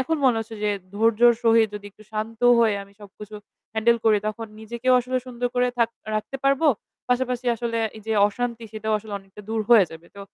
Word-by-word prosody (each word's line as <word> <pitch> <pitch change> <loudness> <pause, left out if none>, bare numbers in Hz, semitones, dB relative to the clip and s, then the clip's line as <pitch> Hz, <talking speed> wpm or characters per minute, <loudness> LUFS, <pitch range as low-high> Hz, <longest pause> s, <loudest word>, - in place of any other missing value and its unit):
এখন 320 +5 0
মনে 250 -3 +4
হচ্ছে 225 0 -8
যে 210 - +2 0.3
ধৈর্যর 230 +2 +5
সহিত 225 -1 +4
যদি 205 0 -7
একটু 215 - -19
শান্ত 220 +2 -4 0.2
হয়ে 225 -3 +4
আমি 200 0 -17
সবকিছু 210 +1 -12 0.4
হ্যান্ডেল 230 +2 +3
করি, 215 -2 +5
তখন 225 +1 -5
নিজেকেও 235 +3 -1
আসলে 255 +1 -3
সুন্দর 245 0 -3
করে 250 0 +2
থাক 230 - +3 0.3
রাখতে 215 +5 -3
পারব। 275 +2 +2 0.5
পাশাপাশি 250 0 0
আসলে 230 0 -2 0.2
এই 215 - -11
যে 220 - -1 0.2
অশান্তি 235 +1 -4
সেটাও 220 0 -3
আসলে 210 0 -11
অনেকটা 195 +1 -15
দূর 225 0 -1
হয়ে 220 -5 +8
যাবে। 165 +1 -12
তো 200 - -9
225 Hz, 195 wpm, -24 LUFS, 215-245 Hz, 0.5 s, হয়ে